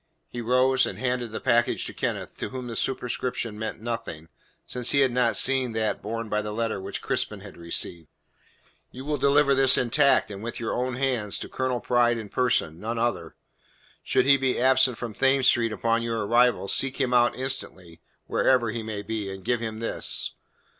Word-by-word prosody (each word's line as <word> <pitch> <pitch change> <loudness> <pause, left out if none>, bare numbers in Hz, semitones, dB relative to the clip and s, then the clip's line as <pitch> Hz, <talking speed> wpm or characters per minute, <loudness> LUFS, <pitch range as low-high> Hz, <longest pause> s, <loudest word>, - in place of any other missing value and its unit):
He 120 - -5
rose 130 +2 +3
and - - -6
handed 125 -2 -2
the 110 - -4
package 120 -2 +1
to - - -6
Kenneth, - - -3
to - - -3
whom 130 -1 -6
the 115 -2 -6
superscription 125 -4 -2
meant 110 -1 -4
nothing, 95 -9 -5 0.4
since 125 -1 -2
he 140 - +4
had 130 -2 +3
not 120 -1 +2
seen 130 -3 +2
that 110 -1 -1
borne 115 +2 -4
by 105 0 0
the 105 0 -5
letter 115 -2 -2
which 100 +1 -6
Crispin 105 -2 -2
had 100 -1 -11
received. 85 -1 -4 0.8
"You 130 +2 -10
will 150 0 -1
deliver 140 +1 +4
this 135 -1 +5
intact, 130 -1 +3
and 100 0 -7
with 120 +2 -5
your 115 - -2
own 125 0 -2
hands, 125 -6 0
to - - -6
Colonel 130 -2 -2
Pride 120 -1 +2
in 110 -3 -7
person 90 -11 0
none 115 +3 -4
other. 120 +1 -2 0.7
Should - - +1
he 140 0 +6
be 130 -1 0
absent 130 -1 +3
from 120 -3 -5
Thames 135 +2 +2
Street 115 -2 +3
upon 115 +1 0
your 115 -2 -2
arrival, 120 -1 +3
seek 135 +7 -1
him 130 -2 +1
out 120 0 +4
instantly, 95 -10 -5 0.2
wherever 120 -4 +2
he 115 +1 -4
may 110 -2 -5
be, 105 -2 -4
and 95 -1 -9
give 120 -1 +1
him 110 -1 -5
this. 115 - -1
120 Hz, 195 wpm, -26 LUFS, 110-130 Hz, 0.8 s, he